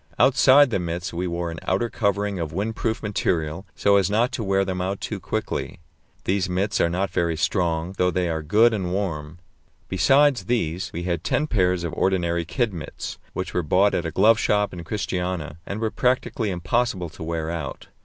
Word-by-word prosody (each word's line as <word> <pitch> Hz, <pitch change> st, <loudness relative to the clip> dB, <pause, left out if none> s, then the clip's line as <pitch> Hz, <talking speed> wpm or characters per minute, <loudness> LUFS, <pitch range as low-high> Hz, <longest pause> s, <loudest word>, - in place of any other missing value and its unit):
Outside 135 Hz, 0 st, +6 dB
the 100 Hz, -, +1 dB
mits 85 Hz, +2 st, -4 dB
we 90 Hz, +2 st, -2 dB
wore 85 Hz, 0 st, -3 dB
an 80 Hz, -, -7 dB
outer 95 Hz, +6 st, 0 dB
covering 100 Hz, -3 st, -1 dB
of 80 Hz, -2 st, -2 dB
windproof 110 Hz, +5 st, -2 dB
material, 90 Hz, -3 st, -1 dB
so 100 Hz, 0 st, +4 dB
as 95 Hz, -1 st, +2 dB
not 115 Hz, +5 st, +2 dB
to 115 Hz, -1 st, -3 dB
wear 95 Hz, -1 st, +2 dB
them 90 Hz, -1 st, -2 dB
out 95 Hz, +2 st, -2 dB
too -, -, -4 dB
quickly. -, -, -3 dB, 0.4 s
These 95 Hz, 0 st, 0 dB
mits 95 Hz, +3 st, 0 dB
are 85 Hz, -, +3 dB
not 90 Hz, +1 st, -1 dB
very 85 Hz, -3 st, 0 dB
strong, 85 Hz, 0 st, 0 dB
though 90 Hz, -, +4 dB
they 90 Hz, -1 st, 0 dB
are 80 Hz, -1 st, -2 dB
good 110 Hz, +10 st, +4 dB
and 95 Hz, -4 st, -2 dB
warm. 85 Hz, -5 st, -3 dB, 0.5 s
Besides 135 Hz, -, +4 dB
these, 90 Hz, -6 st, -1 dB
we 85 Hz, -, -5 dB
had 85 Hz, -2 st, -2 dB
ten 150 Hz, -, +1 dB
pairs 90 Hz, -, +1 dB
of 85 Hz, -, -3 dB
ordinary 85 Hz, -3 st, 0 dB
kid 105 Hz, +6 st, -1 dB
mits, 80 Hz, -3 st, -7 dB
which -, -, -4 dB
were 90 Hz, -, +1 dB
bought 95 Hz, +6 st, +3 dB
at 85 Hz, -, 0 dB
a -, -, -2 dB
glove 110 Hz, +7 st, +4 dB
shop 105 Hz, -3 st, +1 dB
in 85 Hz, -1 st, -7 dB
Christiania, 90 Hz, -4 st, -3 dB
and 100 Hz, -, -4 dB
were 110 Hz, -1 st, -1 dB
practically 125 Hz, -3 st, 0 dB
impossible 95 Hz, 0 st, -1 dB
to 80 Hz, -, -14 dB
wear 80 Hz, 0 st, -2 dB
out. 80 Hz, -5 st, -6 dB
95 Hz, 195 wpm, -24 LUFS, 85-105 Hz, 0.5 s, Outside